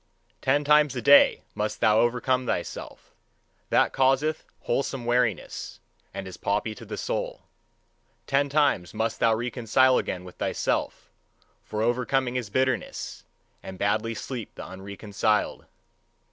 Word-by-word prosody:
Ten 145 +3 +2
times 150 -2 +4
a 125 - -2
day 140 +3 +6
must 105 0 -3
thou 110 0 +4
overcome 125 +2 +1
thyself: - - -5 0.6
that - - +3
causeth 135 +4 +2 0.2
wholesome 130 0 -2
weariness, 120 -4 -1 0.3
and 95 -1 -6
is 95 - -9
poppy 105 +2 -1
to - - -11
the - - -6
soul. - - -3 0.8
Ten 140 +1 +1
times 140 - +1
must 110 +1 -1
thou 115 -1 +4
reconcile 125 +2 +2
again 90 -1 -4
with 90 -1 -12
thyself; - - -2 0.5
for 110 0 -3
overcoming 125 +2 0
is 120 -5 -2
bitterness, 130 +4 -2 0.4
and 95 -1 -9
badly 110 +3 0
sleep 120 -1 -6
the - - -8
unreconciled. 100 +2 -2
120 Hz, 130 wpm, -26 LUFS, 105-130 Hz, 0.8 s, day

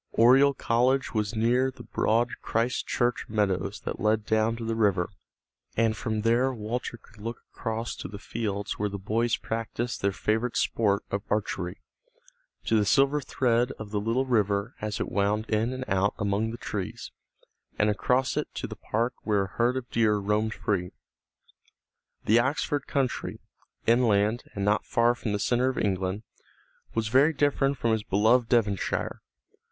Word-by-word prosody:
Oriel 135 +4 +6
College 125 +4 +1
was 105 0 -1
near 120 +4 +2
the 130 - -11
broad 115 +2 +1
Christ 115 +3 -1
Church 120 0 0
meadows 100 -2 0
that - - -5
led 110 0 +1
down 110 +1 +2
to 115 0 -6
the 115 - -1
river, 100 -5 +1 0.7
and 115 -1 +3
from 110 -1 -2
there 120 +4 +3
Walter 120 +1 -4
could 110 0 -20
look 115 +2 -5
across 115 +1 -3
to - - -6
the 100 - -8
fields 105 -1 -4
where 105 0 0
the 100 - -5
boys 110 +4 0
practiced 115 +1 -3
their 100 - +2
favorite 110 +4 -1
sport 105 -2 +1
of 100 - -1
archery, 95 -3 -2 0.8
to 110 - +2
the - - +3
silver 140 +7 +3
thread 125 -2 +1
of 105 -2 -9
the 105 - 0
little 115 +5 0
river 105 -2 +1
as 105 -1 -3
it - - -1
wound 105 +2 +1
in 110 +3 +1
and 130 0 -4
out 95 0 +1
among 105 +1 0
the 115 - -6
trees, - - -5 0.7
and 105 0 +3
across 125 +5 +1
it - - -1
to - - -3
the - - -6
park 120 +3 -1
where 105 -2 +1
a 95 - -6
herd 120 +2 +1
of 125 -2 -5
deer 110 -2 +3
roamed 105 +2 0
free. 90 -4 -1 1.4
The 115 +3 +5
Oxford 140 +2 0
country, 135 -3 -1 0.5
inland 115 -1 +3
and 100 -1 -1
not 105 +1 +2
far 120 +1 +3
from 120 -2 -4
the 105 - 0
centre 120 +4 +1
of 130 - -4
England, 95 +1 -1 0.7
was 115 -1 0
very 140 +7 +5
different 140 -1 +1
from 115 - +1
his 110 -1 +1
beloved 110 +5 +3
Devonshire. 105 -5 0
110 Hz, 170 wpm, -27 LUFS, 105-120 Hz, 1.4 s, Oriel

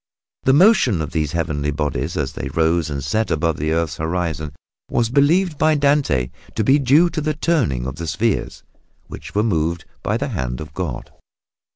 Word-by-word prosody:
The 130 - +5
motion 145 - +5
of 80 0 -3
these 75 -3 -1
heavenly 75 -3 -1
bodies 75 +1 -2
as 70 -3 -2
they - - -5
rose 80 0 +1
and 70 -2 -4
set 110 +10 0
above 80 0 0
the 75 +2 -1
earth's 80 -2 -1
horizon 80 -2 -2 0.4
was 115 -1 0
believed 155 +4 +2
by 155 0 +4
Dante 140 - +1 0.2
to 110 - +1
be 135 +7 +4
due 145 +6 +5
to 155 - -2
the 155 0 -1
turning 135 - 0
of 65 +2 -5
the 85 - -5
spheres, 110 +5 -1 0.4
which - - -10
were 105 - +3
moved 85 -5 -1 0.2
by - - 0
the - - -3
hand 60 -1 -3
of 75 -1 -8
God. 80 -10 -5
85 Hz, 185 wpm, -20 LUFS, -, 0.4 s, The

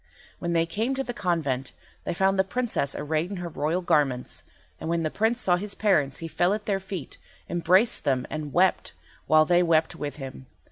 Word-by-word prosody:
When 170 -1 -2
they 165 0 +3
came 220 +10 -1
to 270 - -1
the 245 - -5
convent 155 - -1 0.3
they - - -2
found 190 +2 +2
the - - +6
Princess 220 - -1
arrayed 155 +3 -1
in 200 - -5
her 175 -1 -5
royal 155 +4 -1
garments; 145 -7 0 0.4
and - - -5
when 170 0 0
the 155 - -1
Prince 225 +3 +1
saw 180 -1 +3
his 200 +2 -4
parents 155 -10 +2
he 165 - -5
fell 175 +4 +1
at 210 - -7
their 195 -2 0
feet, 190 -7 -7 0.3
embraced 180 +6 +3
them 130 -3 +1
and 155 -2 -4
wept, 185 +4 +2 0.3
while 155 0 +6
they 175 +2 +4
wept 165 -2 +2
with 145 -1 -5
him. 135 -2 -9
170 Hz, 200 wpm, -26 LUFS, 155-195 Hz, 0.4 s, the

